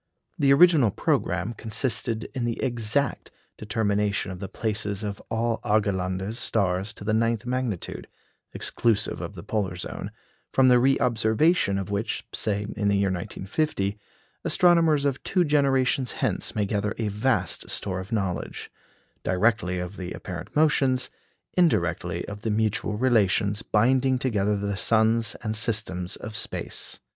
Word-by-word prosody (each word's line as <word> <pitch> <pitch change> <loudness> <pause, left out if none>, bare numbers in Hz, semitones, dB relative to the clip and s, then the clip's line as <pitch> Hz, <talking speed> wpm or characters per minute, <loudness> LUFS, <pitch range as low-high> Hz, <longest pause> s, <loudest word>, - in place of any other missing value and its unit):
The 140 -1 +4
original 150 -5 +6
programme 95 +2 -1
consisted 115 +1 0
in 130 -3 -3
the 120 -1 -2
exact 120 +1 0 0.3
determination 105 -2 -1
of 90 - -7
the 95 -1 -6
places 105 -2 -2
of 100 -1 -4
all 115 0 0
Argelander's 100 0 0
stars 95 -1 0
to 105 - -10
the 110 +1 0
ninth 115 0 +1
magnitude 125 -6 -3 0.4
(exclusive 110 -3 0
of - - -6
the - - -8
polar 100 -4 -2
zone), 90 - -6 0.4
from 130 -1 +5
the 125 -1 +6
reobservation 120 - +2
of 95 0 -4
which, 100 +3 -2
say, 105 -1 0
in 105 - 0
the 100 0 +3
year 100 0 +2
1950, 100 - -2 0.4
astronomers 165 -5 +4
of 135 -2 0
two 185 -2 +1
generations 135 -3 +2
hence - - -2
may 105 - +1
gather 100 0 -1
a 115 - -1
vast 105 -4 -1
store 95 -1 -1
of 95 +1 -8
knowledge 95 -6 -3 0.5
directly 95 -1 +1
of 90 +3 -5
the 90 -1 -5
apparent 90 +1 -8
motions, 140 -4 +2 0.4
indirectly 90 - +1
of 105 0 -7
the 110 - -2
mutual 105 -1 0
relations 105 -4 +2
binding 130 +5 +2
together 105 -5 0
the 100 0 -2
suns 115 +2 +2
and 110 -1 -2
systems 105 -5 +1
of 110 0 -8
space. - - -3
110 Hz, 140 wpm, -25 LUFS, 100-125 Hz, 0.5 s, original